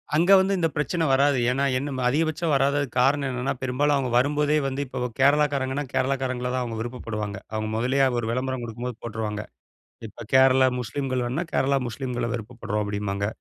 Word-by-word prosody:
அங்க 175 +5 +3
வந்து 195 +1 +2
இந்த 165 - +2
பிரச்சன 160 +3 0
வராது. 140 0 +3
ஏன்னா, 135 +2 0
என்ன 130 -2 -3
அதிகபட்சம் 160 +2 0
வராததுக்கு 140 -1 +1
காரணம் 140 +1 +2
என்னென்னா, 125 +1 -2
பெரும்பாலும் 140 +3 +1
அவுங்க 130 -3 -1
வரும்போதே 150 +3 +2
வந்து 135 +1 -3
இப்ப 125 -1 -3
கேரளாக்காரங்கன்னா, 140 -1 +2
கேரளாக்காரங்கள 130 -2 -1
தான் 130 - 0
அவுங்க 115 -2 -5
விருப்பப்படுவாங்க. 105 -4 -5 0.2
அவுங்க 110 0 -2
முதல்லயே 135 +3 +2
ஒரு 110 - -3
விளம்பரம் 130 0 -2
கொடுக்கும்போது 120 +1 -5
போட்ருவாங்க. 110 -2 -4 0.6
இப்ப 110 +3 -11
கேரளா 130 0 +6
முஸ்லீம்கள் 130 +1 -2
வேணுனா, 140 +9 -2
கேரளா 135 +1 +2
முஸ்லீம்கள 125 0 -3
விருப்பப்படுறோம் 110 -2 -4
அப்பிடிம்பாங்க. 100 -1 -2
130 Hz, 155 wpm, -25 LUFS, 120-140 Hz, 0.6 s, கேரளா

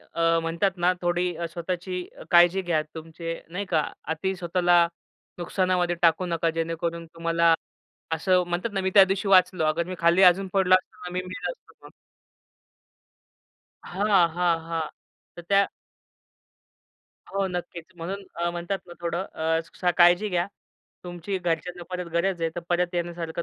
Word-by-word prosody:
अ, 165 0 +3
म्हणतात 165 +4 0
ना 175 +1 +3
अ, - - +3
थोडी 175 0 0 0.2
स्वतःची 180 +1 -4 0.3
काळजी 175 +2 +6
घ्या, 170 -4 +1
तुमची 165 +1 -6 0.2
नाही 190 +4 -4
का. 165 -5 +1 0.2
अती 175 +5 -2
स्वतःला 175 -1 +3 0.5
नुकसानामध्ये 180 0 0
टाकू 170 +1 +3
नका, 170 -1 0
जेणेकरून 165 +1 -3
तुम्हाला 165 0 +2 0.6
असं 180 +3 +2
म्हणतात 175 +6 -2
ना, 195 - 0
मी 190 - 0
त्यादिवशी 195 0 +5
वाचलो. 185 -3 +4
अगर 155 +2 +1
मी 185 - -5
खाली 170 +3 +4
अजून 190 +2 +5
पडलो 190 -1 +5
असतो 185 - -3
ना, - - -4
मी 180 - -1
मेलो 185 0 -4
असतो - - -18
मग. - - -13 1.9
हां, 195 -2 +2
हां, 175 -2 +2
हां. 165 -2 -2 0.5
तर 175 - -8
त्या 200 0 +4 1.7
हो, 195 0 0
नक्कीच. 175 -2 -5
म्हणून 190 +4 -5
अ, 170 +1 -1
म्हणतात 175 +3 -3
ना 175 - -11
थोडं 170 +2 -2
अ, 160 +1 0
स - - -13
काळजी 175 +4 +6
घ्या, 175 -2 0 0.6
तुमची 180 +2 -4
घरच्यांना 175 0 -3
परत 180 -1 -4
गरज 170 +1 0
आहे, 165 - +1
तर 175 - -4
परत 175 0 0
येण्यासारखं 170 -1 -3
175 Hz, 150 wpm, -25 LUFS, 170-185 Hz, 1.9 s, काळजी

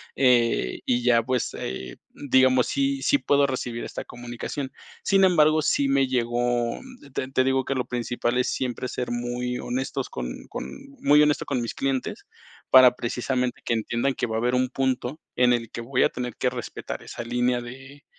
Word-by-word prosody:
eh, 120 - +2
y 120 -1 +1
ya 120 -1 +4
pues, 125 0 -1
eh, 65 -1 -6
digamos, 130 -2 +3
sí 275 0 0
sí 285 - +3
puedo 145 - +3
recibir 125 -3 -3
esta - - -6
comunicación. 120 +3 -6 0.3
Sin 195 0 +3
embargo, 155 -4 +5
sí 140 -2 +2
me 135 -1 +3
llegó 120 -1 0 0.3
te 130 - -2
te 130 -1 +2
digo 130 0 +1
que 135 - -1
lo 125 - -1
principal 120 0 -2
es 125 - +1
siempre 125 -1 -2
ser 125 0 -4
muy 120 +1 -2
honestos 130 +1 -3
con - - -6
con - - -5 0.4
muy 145 +1 +6
honesto 150 -1 +2
con 130 -4 -1
mis 115 - -3
clientes, 135 -1 -2 0.4
para 130 -1 +8
precisamente 125 +1 -2
que - - +1
entiendan 120 +4 0
que - - -1
va 110 - -3
a 110 - +1
haber 125 +2 +1
un 125 0 +1
punto 130 +2 -1 0.2
en 125 0 +4
el 115 -2 -2
que - - -5
voy 125 +2 +1
a - - +4
tener 125 -2 -5
que - - +1
respetar - - -6
esa 120 - -7
línea 125 +1 0
de 135 +4 -11
125 Hz, 185 wpm, -25 LUFS, 120-135 Hz, 0.4 s, para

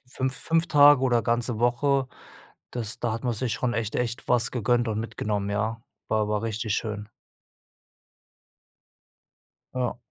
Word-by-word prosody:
5- 130 +1 -2
5 165 +3 +1
Tage 145 -2 +7
oder 120 -3 +2
ganze 115 -1 0
Woche, 130 +3 +2 0.6
das 120 0 -5
da 120 -2 0
hat 115 +3 -5
man 120 - +1
sich 115 0 -2
schon 125 -2 -1
echt 115 -2 -2
echt 120 +2 -3
was 120 -1 +2
gegönnt 120 0 +1
und 110 0 -1
mitgenommen, 105 -2 -2
ja. 110 +3 -1 0.3
War 110 0 +2
aber 105 0 -1
richtig 110 -1 -2
schön. 105 -1 -3 2.7
Ja. 125 -1 -1
120 Hz, 140 wpm, -26 LUFS, 110-125 Hz, 2.7 s, Tage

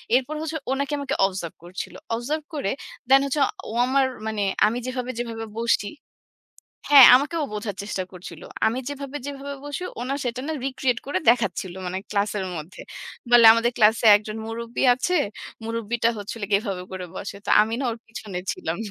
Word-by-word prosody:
এরপর 265 +4 0
হচ্ছে 320 0 -3
ও - - +1
নাকি 280 +1 -2
আমাকে 280 - -2
অবজার্ভ 185 -4 -4
করছিল। 175 +2 -7 0.2
অবজার্ভ 285 +7 -2
করে 280 -10 -1 0.4
দ্যান 270 +1 +7
হচ্ছে 280 +2 -1 0.3
ও - - -6
আমার 265 +1 +3 0.2
মানে 215 -1 -2 0.2
আমি 220 +3 +1
যেভাবে, 255 0 -3
যেভাবে 230 -2 -4
বসছি 230 -3 +1 1.0
হ্যাঁ, 275 -4 +11
আমাকে 285 +6 -2
ও - - +1
বোঝার 210 -2 -4
চেষ্টা 200 -2 -3
করছিল। 175 -3 -10 0.2
আমি 225 +3 0
যেভাবে, 280 0 -6
যেভাবে 280 0 -6
বসি 290 +4 -5 0.2
ও - - -4
না 275 - 0
সেটা 245 0 -2
না 315 - -1
রিক্রিয়েট 260 -2 0
করে 285 +7 0
দেখাচ্ছিল 195 -6 -1
মানে 185 +1 -3
ক্লাসের 205 -1 0
মধ্যে। 155 +4 -8 0.5
বলে 240 -1 +7
আমাদের 230 +1 +2
ক্লাসে 220 +1 +4
একজন 215 +1 -6
মুরুব্বি 230 +1 -4
আছে, 355 +9 0 0.5
মুরুব্বিটা 230 +1 -1
হচ্ছিল 205 +2 -7
গিয়ে 200 -1 +4
এভাবে 195 -4 -3
করে 185 -1 -5
বসে। 200 - -6
তো - - -1
আমি 220 +1 -2
না - - -2
ওর 230 - -6
পিছনে 215 -5 -7
ছিলাম। 165 +1 -4
230 Hz, 180 wpm, -24 LUFS, 205-270 Hz, 1.0 s, হ্যাঁ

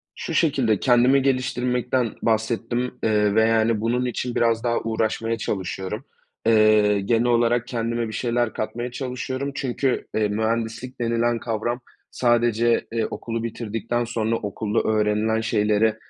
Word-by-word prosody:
Şu 165 - -5
şekilde 135 - +2
kendimi 125 +2 +4
geliştirmekten 125 -2 0
bahsettim, 115 +2 0
eee, 105 -2 +2
ve, 110 - +5
yani, 115 -1 +2
bunun 120 +3 0
için 125 0 -3
biraz 115 -1 +2
daha 120 -1 +1
uğraşmaya 115 0 -1
çalışıyorum. 95 +3 -4 0.4
Eee, 110 -2 +4
genel 115 +4 +1
olarak 120 0 +2
kendime 115 -1 -2
bir 110 - -7
şeyler 120 0 0
katmaya 120 +3 -4
çalışıyorum 130 +2 -4
çünkü, 130 -1 -1
eee, 110 -1 +2
mühendislik 115 +4 -2
denilen 115 0 +1
kavram 115 +2 -2 0.3
sadece, 120 -1 +2
eee, 115 -1 0
okulu 115 -1 -4
bitirdikten 115 +1 -3
sonra 115 -1 -1
okulda 105 0 -2
öğrenilen 110 +1 +1
şeyleri, 110 0 +2
115 Hz, 130 wpm, -23 LUFS, 110-120 Hz, 0.4 s, ve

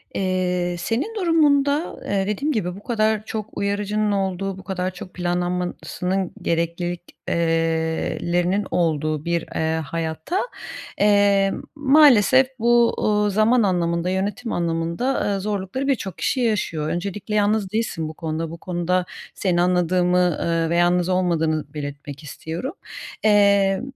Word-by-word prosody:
Eee, 180 -2 0
senin 260 - -2
durumunda, 305 -5 +2
eee, 195 -1 0
dediğim 275 +9 -1
gibi, 180 - -2
bu 200 - -12
kadar 220 -3 0
çok 220 -1 -5
uyarıcının 205 +1 0
olduğu, 195 -1 -1
bu 190 - -11
kadar 185 -1 -2
çok 185 0 -10
planlanmasının 180 +1 -2
gereklilik 170 +1 -1 0.3
eee, - - 0 1.0
lerinin 180 +3 +1
olduğu 155 -3 0
bir, 170 0 0
eee, 160 0 0
hayatta, 165 - -3 0.6
eee, 200 -1 +4 0.2
maalesef 265 -4 +6
bu, 235 0 +4
uuu, 210 -1 +2
zaman 215 +4 +3
anlamında, 170 -2 0
yönetim 205 +5 -2
anlamında, 170 +5 -1
aaa, 205 -1 0
zorlukları 205 +6 -3
birçok 205 - -1
kişi 265 - 0
yaşıyor. 190 -9 0
Öncelikle 200 +5 -3
yalnız 205 -1 +1
değilsin 215 -8 -2
bu - - -8
konuda. 160 0 -4
Bu 170 - -7
konuda 180 +1 -1 0.3
seni 175 -3 +1
anladığımı, 180 -1 +2
eee, 165 -1 0
ve 170 - 0
yalnız 175 +1 +2
olmadığını 160 -5 0
belirtmek 145 0 -7
istiyorum. 165 - -6 0.5
Eee, 200 -2 +4
185 Hz, 130 wpm, -22 LUFS, 170-210 Hz, 1.0 s, maalesef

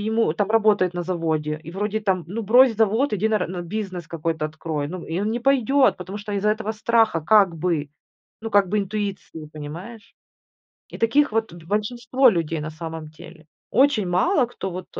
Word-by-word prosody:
ему 220 -7 +2
там 205 +3 -1
работает 210 -5 +3
на 175 - -2
заводе, 160 -4 -2
и - - -6
вроде 210 +3 -2
там, 190 -5 0
ну, 215 +6 -4
брось 245 +3 +5
завод, 225 +5 +2
иди 210 +2 +1
на 215 - +2
ра - - -2
на 180 0 -5
бизнес 185 -2 -5
какой-то 160 -1 -3
открой, 155 -1 -4
ну. 180 +1 -7
И 165 +4 -2
он 210 +2 -1
не 235 - -1
пойдет, 270 +1 +3
потому 185 +3 -7
что 205 0 -7
из-за 200 +1 0
этого 220 0 -2
страха 225 -5 +2
как 195 0 +4
бы, 160 -3 -1 0.5
ну 225 - -5
как 200 -3 +4
бы 210 - -1
интуиции, 195 -6 -4
понимаешь. 170 +10 -9 0.8
И - - -8
таких 255 +3 +2
вот 225 -5 -1
б 170 - -13
большинство 240 +6 +2
людей 165 -4 -2
на 155 +1 -5
самом 160 -1 -7
деле. 155 +1 -14 0.2
Очень 265 -8 +3
мало, 250 - +2
кто 195 -5 -6
вот, 180 +1 -7
200 Hz, 190 wpm, -23 LUFS, 165-220 Hz, 0.8 s, брось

